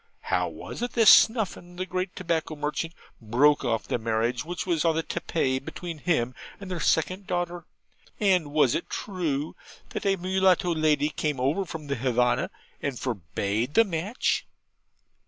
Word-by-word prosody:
'How 90 0 0
was 80 - -8
it 245 - -2
that 225 -2 +4
Snuffin, 200 -6 +4
the 185 +1 -3
great 185 0 -3
tobacco 165 -3 -2
merchant, 150 +3 -3 0.3
broke 130 +7 +3
off 115 -3 -1
the - - -1
marriage 115 +2 0
which 175 +3 -4
was 170 -4 +1
on 165 -2 +3
the 165 - 0
tapis 135 -7 -1
between 165 +3 -7
him 130 -7 0 0.3
and 195 -2 -8
their 180 - -2
second 185 +5 +1
daughter; 175 -1 -2 0.5
and 185 -7 +2
was 145 -5 +4
it - - -2
true 160 -7 -3 0.3
that - - -3
a 195 - +4
mulatto 185 -1 +2
lady 155 -2 +2
came 150 -2 -2
over 145 +10 +1
from 160 -3 -7
the 140 -1 -2
Havanna 125 0 +1 0.3
and 140 -3 -2
forbade 110 - -2
the 225 - +7
match?' 195 +4 -1
160 Hz, 160 wpm, -26 LUFS, 130-180 Hz, 0.5 s, the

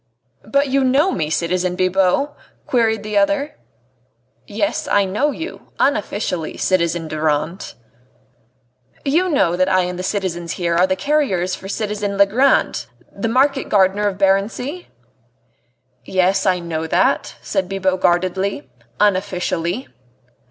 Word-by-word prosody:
"But 280 +5 +1
you 270 +1 +2
know 275 +8 +3
me, 155 -3 -2
citizen 180 +2 0
Bibot?" 190 +9 +2 0.3
queried 225 -3 +1
the 210 -1 +1
other. 290 +8 0 0.9
"Yes, 205 0 -2
I 205 -1 +3
know 210 +10 0
you 320 +3 -7
unofficially, 205 - -1
citizen 170 -3 0
Durand." 155 - -2 1.3
"You 335 +7 +2
know 225 - +2
that 185 +1 +2
I 185 -1 +3
and 180 0 -3
the - - -2
citizens 185 -3 -2
here 170 -2 -1
are 180 +2 +4
the 185 - +1
carriers 190 -6 0
for 195 - -7
citizen 205 -1 -3
Legrand, 200 - +3 0.3
the 210 +3 -2
market 270 +3 +2
gardener 200 +1 +3
of 195 -2 -2
Barency?" 205 - 0 1.2
"Yes, 190 - +1
I 185 -1 +3
know 165 -2 -4
that," - - +1
said 190 -3 -2
Bibot 190 -1 -1
guardedly, 180 -5 0 0.3
"unofficially." 185 +1 0
195 Hz, 125 wpm, -19 LUFS, 180-225 Hz, 1.3 s, are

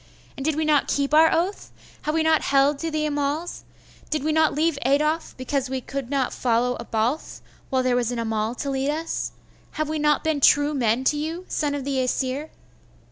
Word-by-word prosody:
And 270 - -6
did 310 +1 +1
we 315 0 0
not 300 -2 +3
keep 280 +1 0
our 320 +1 +6
oath? 365 +5 -1 0.3
Have 305 - -2
we 325 - +2
not 320 -1 +3
held 275 +1 +3
to 330 - -2
the 310 -1 -1
Amals? 290 +3 -2 0.5
Did 305 -3 -1
we 310 - +1
not 315 -1 +3
leave 310 -1 +1
Adolf, 300 +5 +1
because 260 +1 -2
we 260 -1 -3
would 275 -3 -3
not 275 -3 0
follow 245 0 +1
a 235 - -6
Balth, 230 +8 -2 0.3
while 260 -1 +1
there 255 -1 +2
was 245 -1 0
an 245 - -3
Amal 225 0 -1
to 280 +2 -3
lead 270 +1 -1
us? 320 +2 -2 0.4
Have 310 -1 -2
we 310 0 -2
not 300 0 +2
been 315 -2 0
true 290 +2 +5
men 240 -2 +1
to 295 +3 +2
you, 325 +4 -4
son 290 -2 -1
of 280 - -4
the 275 -1 -1
Aesir? 260 +3 -1
285 Hz, 210 wpm, -24 LUFS, 260-310 Hz, 0.5 s, our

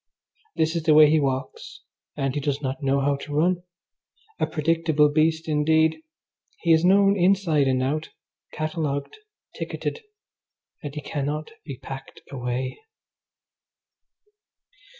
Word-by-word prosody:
This 160 +1 +1
is 165 - 0
the 155 -1 +4
way 150 -1 +8
he 160 - +4
walks, 150 - -4 0.4
and 135 -2 -1
he 145 - -2
does 140 0 -1
not 135 +1 -4
know 140 0 +1
how 140 0 +1
to 145 +1 -7
run. 175 +3 +2 0.8
A - - +1
predictable 160 -1 +2
beast 160 +2 +1
indeed! 160 +1 +2 0.6
He 170 - +4
is 160 +1 +3
known 195 +2 +5
inside 180 -6 +2
and 130 -1 +1
out, 155 +4 -2 0.4
catalogued, 155 -3 -3 0.4
ticketed, - - -4 0.8
and 145 -3 -7
he 150 - -4
cannot 150 +1 -4
be 140 -4 -7
packed 135 +1 -9
away. 125 -1 -3
150 Hz, 130 wpm, -24 LUFS, 140-160 Hz, 0.8 s, way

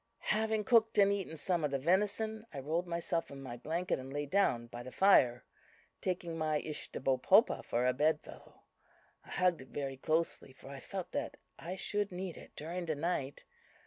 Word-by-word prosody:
"Having 220 0 +1
cooked 225 +1 +4
and 200 -1 +6
eaten 190 -5 -4
some 175 +1 0
of 150 - +2
the 140 - 0
venison, 210 - 0
I - - -8
rolled 160 +6 -1
myself 170 -1 -2
in 140 - -9
my 130 -3 -6
blanket 165 +8 -2
and 130 +1 -8
lay 145 +1 -2
down 140 -8 +2
by 120 +1 -8
the 130 +1 -8
fire, 125 -11 +5 0.6
taking 175 -3 -2
my 155 -1 +1
Ishtahbopopa 150 - +2
for 120 +1 0
a 125 - +3
bed 150 +3 +2
fellow. - - -14 0.6
I - - -18
hugged 180 -5 +2
it 130 - -12
very 135 -1 -4
closely, 155 -2 -1
for 135 - -13
I 140 -1 -7
felt 190 +4 -6
that - - -3 0.2
I 175 +3 -5
should 205 +1 -1
need 180 -1 -5
it - - -13
during 170 +3 -4
the 155 - 0
night. 145 -3 -2
165 Hz, 185 wpm, -34 LUFS, 135-190 Hz, 0.6 s, and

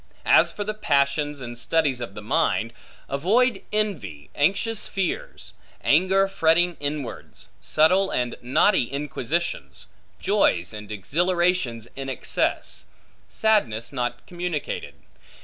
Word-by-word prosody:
As - - +5
for 205 - -4
the 215 +1 -3
passions, 145 -6 0
and 120 -1 -6
studies 135 0 0
of 100 -5 -6
the 105 - -8
mind; 115 -3 0 0.3
avoid 215 - +2
envy, 140 - -3
anxious 200 +9 +1
fears; 190 -3 -4 0.3
anger 190 +5 +4
fretting 175 -1 +2
inwards; 145 -3 -5
subtle 185 +5 +3
and 125 -1 -1
knotty 135 +4 +3
inquisitions; 150 +3 -3 0.3
joys 85 +3 +1
and 105 0 -8
exhilarations 170 - 0
in 135 0 -5
excess; 130 - -1 0.4
sadness 135 - +1
not 120 -2 -3
communicated. 175 -4 -4
150 Hz, 110 wpm, -24 LUFS, 120-185 Hz, 0.4 s, As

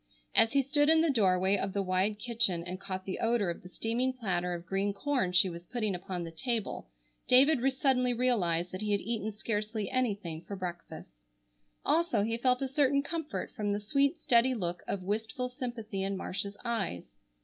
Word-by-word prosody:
As 225 +3 +5
he 275 -1 +4
stood 290 +2 +3
in 320 0 +6
the 325 -2 +3
doorway 190 -5 +3
of 195 -1 -2
the 200 - 0
wide 190 +3 +1
kitchen 215 -7 +1
and 180 +1 -6
caught 185 -1 -5
the 190 - -4
odor 225 -5 +1
of 170 - -8
the 180 - -12
steaming 235 +7 -1
platter 180 -7 -1
of 170 0 -8
green 195 +2 -1
corn 255 -3 0
she 180 +1 +5
was 170 -1 -6
putting 215 -2 -2
upon 180 0 -4
the 165 - -6
table, 220 - -3 0.4
David 270 +2 +6
suddenly 260 -2 +2
realized 185 -9 +1
that 185 - -5
he 210 -1 0
had 200 - +1
eaten 220 -1 -3
scarcely 215 -1 -3
anything 200 -10 -1
for 200 - -5
breakfast. 175 - -7 0.6
Also, 330 -9 +2
he 225 +2 0
felt 250 +2 +1
a - - 0
certain 280 0 +2
comfort 320 0 -4
from 205 -1 -2
the 205 - -1
sweet 275 +9 +1
steady 255 -3 +3
look 175 -5 -3
of 195 -2 -3
wistful 220 +5 -2
sympathy 235 -5 -5
in 195 0 -1
Marcia's 200 +2 -4
eyes. 205 - -2
210 Hz, 190 wpm, -31 LUFS, 185-250 Hz, 0.6 s, in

